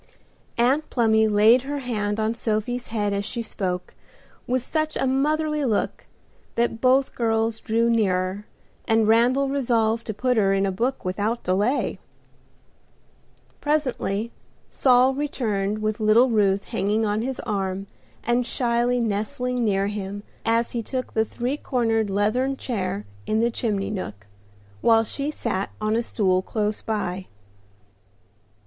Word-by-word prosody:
Aunt 265 +6 +2
Plumy 220 -2 +3
laid 215 +4 +5
her 285 +2 -4
hand 215 -5 -2
on 220 +1 +1
Sophie's 235 +2 -2
head 205 -2 -1
as 200 0 -1
she 230 +3 -4
spoke, 180 -4 -3 0.5
with 255 0 0
such 310 +2 -1
a - - 0
motherly 300 +3 +1
look 225 -6 -1 0.5
that 235 -1 0
both 260 +1 +3
girls 225 -1 0
drew 230 +1 +1
nearer, 200 -3 0 0.4
and 225 -2 +3
Randal 245 +5 +4
resolved 235 -4 +1
to 215 - -2
put 250 +2 +1
her 195 -2 +3
in 195 0 +2
a 195 - 0
book 240 +6 -2
without 205 +6 -1
delay. 205 +9 0 1.6
Presently 255 -7 -1 0.4
Saul 255 0 +4
returned 215 -7 -2
with 215 +1 -1
little 225 +4 +4
Ruth 200 -2 +2
hanging 210 +3 0
on 210 +1 0
his 260 +2 -3
arm 195 -3 -2 0.4
and 240 +1 +2
shyly 240 0 +1
nestling 235 +3 -1
near 195 -3 +2
him 205 0 -4 0.2
as 230 +1 +1
he 235 - -2
took 255 +3 -4
the 220 0 +2
three 250 +5 -3
cornered 225 -6 0
leathern 230 +7 +1
chair 185 - -3 0.2
in 215 - +1
the 235 +1 +2
chimney 210 -4 -2
nook, 105 - -6 0.6
while 225 -1 +5
she 275 +6 -3
sat 210 -9 -2
on 215 0 0
a 230 - +2
stool 190 -5 +1
close 210 +1 -2
by. 190 -4 -3
225 Hz, 140 wpm, -24 LUFS, 205-250 Hz, 1.6 s, laid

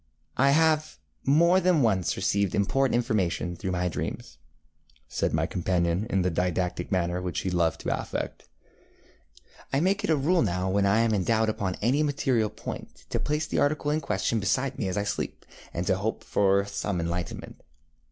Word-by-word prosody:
ŌĆ£I 140 +1 +4
have 155 0 +2 0.3
more 170 +6 +5
than 180 -6 +3
once 95 -6 +1
received 100 0 0
important 130 +6 +2
information 95 -7 0
through 95 - -4
my 90 0 0
dreams, 80 - -5 0.2
ŌĆØ 75 -2 -36
said - - -1
my - - +1
companion, 90 +2 0
in 95 -4 +1
the 90 - +1
didactic 90 +2 -1
manner 90 -1 0
which 90 -3 -3
he 95 - -2
loved 85 -2 +1
to - - 0
affect. - - -5 1.2
ŌĆ£I 140 +3 +1
make 195 +3 +1
it - - -1
a 160 - +5
rule 165 +6 +2
now 95 -2 0
when 100 0 +2
I 105 +3 +4
am 115 -1 +2
in 100 -3 +1
doubt 110 +2 +2
upon 100 -4 -2
any 130 +6 +3
material 135 -7 +1
point 110 - -8
to - - 0
place 150 +1 -1
the - - -1
article 145 0 +1
in 155 +1 0
question 115 -4 0
beside 130 +7 0
me - - -1
as 95 - -2
I 100 - +1
sleep, 100 - -4 0.3
and 85 - -3
to 95 - +2
hope 110 +3 -3
for 100 0 +2
some 100 -2 -3
enlightenment. 85 +1 -4
100 Hz, 185 wpm, -27 LUFS, 90-140 Hz, 1.2 s, more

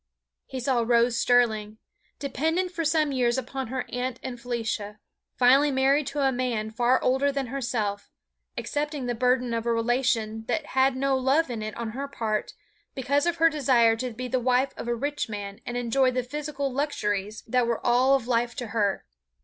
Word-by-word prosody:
He 260 - -5
saw 250 -1 +1
Rose 235 0 +3
Sterling, 220 -3 +2 0.4
dependent 320 +7 -1
for 335 -2 -3
some 310 -2 +2
years 245 -2 +1
upon 265 0 -4
her 255 +2 -3
aunt 250 0 -3
and 245 -2 -6
Felicia, 225 -3 -3 0.4
finally 270 +4 +5
married 270 +1 +2
to 285 +1 -2
a 270 -1 +3
man 240 -4 -2
far 245 +3 +2
older 265 +2 +2
than 275 -1 -2
herself, 225 -6 -3 0.5
accepting 295 -2 -3
the 245 - -1
burden 250 0 +1
of 230 0 -2
a - - +2
relation 230 -2 0
that 295 +5 -1
had 265 0 +3
no 270 +1 +1
love 270 +3 +2
in 225 -2 -4
it 215 0 -5
on 230 -2 -4
her 275 +5 -4
part, 220 -6 -3 0.4
because 280 +4 +1
of 345 - +1
her 330 0 +4
desire 245 -6 +3
to 255 +2 -3
be 250 +2 -6
the 255 +1 0
wife 255 +2 +1
of - - -7
a 240 - 0
rich 285 +1 -3
man 205 0 -6
and 245 - -3
enjoy 245 +2 +2
the 255 0 -1
physical 285 0 -4
luxuries 210 -7 -2
that 250 0 +1
were 235 -1 0
all 255 +3 +4
of 250 -3 -2
life 240 -1 0
to 245 -5 -5
her. 205 -3 0
250 Hz, 190 wpm, -26 LUFS, 230-275 Hz, 0.5 s, finally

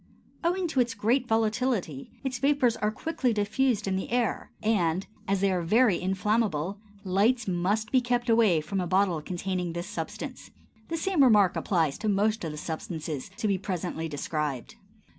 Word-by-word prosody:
Owing 355 +2 +1
to 280 - 0
its 240 -2 +1
great 235 +5 +1
volatility, 220 - 0
its 255 -2 -3
vapors 275 -4 +3
are 210 - 0
quickly 250 +1 -1
diffused 215 +1 +1
in 190 -1 0
the 190 - -4
air, 240 -2 0
and, 190 -5 +1 0.2
as 195 -1 +1
they 200 -1 +3
are 180 -1 0
very 210 +3 +3
inflammable, 195 -2 0 0.2
lights 210 +5 +2
must 195 +4 0
be 255 - +4
kept 245 0 0
away 225 -8 +4
from 185 +5 -2
a 180 - -2
bottle 185 -3 +2
containing 180 +1 -3
this 170 +1 -4
substance. 205 - -6 0.4
The 330 - -2
same 355 -3 +2
remark 210 -7 +5
applies 160 -7 0
to 215 - -1
most 210 +2 +1
of 160 - -3
the 150 - -7
substances 160 -2 -5
to 225 -2 -1
be 195 -2 +1
presently 180 -4 -3
described. 150 - -3
205 Hz, 170 wpm, -28 LUFS, 175-240 Hz, 0.4 s, remark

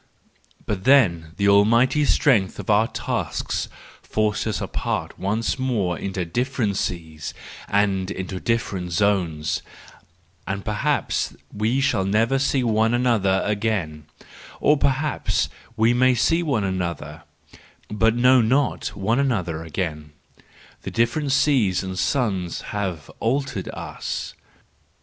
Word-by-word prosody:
But 100 -3 -3
then 85 - +4
the 100 - +2
almighty 115 +8 +4
strength 115 -11 +3
of - - -2
our 105 +2 +4
tasks - - -3 0.3
forced 110 0 -1
us 110 - -1
apart - - -3
once 110 +6 -1
more 110 -9 0
into 95 0 -3
different 120 +1 -1
seas 80 -4 -4 0.3
and 100 -2 +1
into 95 -1 -5
different 100 -7 -2
zones, 85 -6 0 0.9
and 100 0 -3
perhaps 140 +8 -1 0.2
we 110 +6 0
shall 120 -8 +2
never 115 +7 +2
see 135 -1 +1
one 110 0 +2
another 110 -6 +2
again,—or 100 - -2
perhaps 140 +3 0 0.3
we 110 +2 +4
may 130 +1 +4
see 165 +8 +2
one 135 -11 0
another, 90 -4 -3 0.7
but 110 +2 +2
not 125 +1 +5
know 135 +4 +2 0.2
one 110 +5 0
another 95 - 0
again; 75 -3 -4 0.7
the - - -5
different 120 +5 0
seas 135 -10 +2
and 95 0 -4
suns 95 -11 0
have 95 -7 -3
altered 130 -3 -1
us - - -5
105 Hz, 115 wpm, -23 LUFS, 95-125 Hz, 0.9 s, not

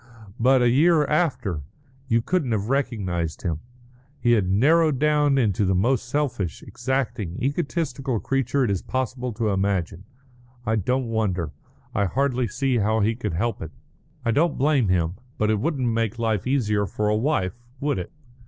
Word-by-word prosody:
But 130 +1 +4
a 120 - +4
year 155 +3 +4
after! 140 - 0 0.5
You 115 -2 +2
couldn't 155 -9 0
have 105 +1 -1
recognised 100 - -1
him. 80 -5 -1 0.6
He 120 - +2
had 105 -6 +3
narrowed 150 - +4
down 150 -1 +3
into 105 -6 +2
the 95 -1 +2
most 120 +5 +1
selfish, 125 - -2
exacting, 115 -9 -2
egotistical 135 -3 -1
creature 135 +1 0
it 115 - +1
is 95 - -1
possible 125 -1 -3
to 110 0 -1
imagine. 95 -2 -1 0.6
I 110 -1 +1
don't 125 +6 0
wonder; 95 -8 -1 0.4
I 100 - +1
hardly 130 +3 0
see 130 +4 0
how 110 +1 +2
he 110 +3 +2
could 110 -5 -4
help 115 +8 -1
it; 80 - -5 0.6
I 115 - +2
don't 150 +6 +2
blame 140 -4 +3
him. 90 -1 +1 0.2
But 110 0 +2
it 110 - +1
wouldn't 140 -1 0
make 115 -1 0
life 110 -2 -1
easier 105 -7 +1
for 105 +1 -2
a 105 - +2
wife, 110 - 0 0.3
would 145 -8 0
it? 90 - -6
115 Hz, 165 wpm, -24 LUFS, 100-135 Hz, 0.6 s, But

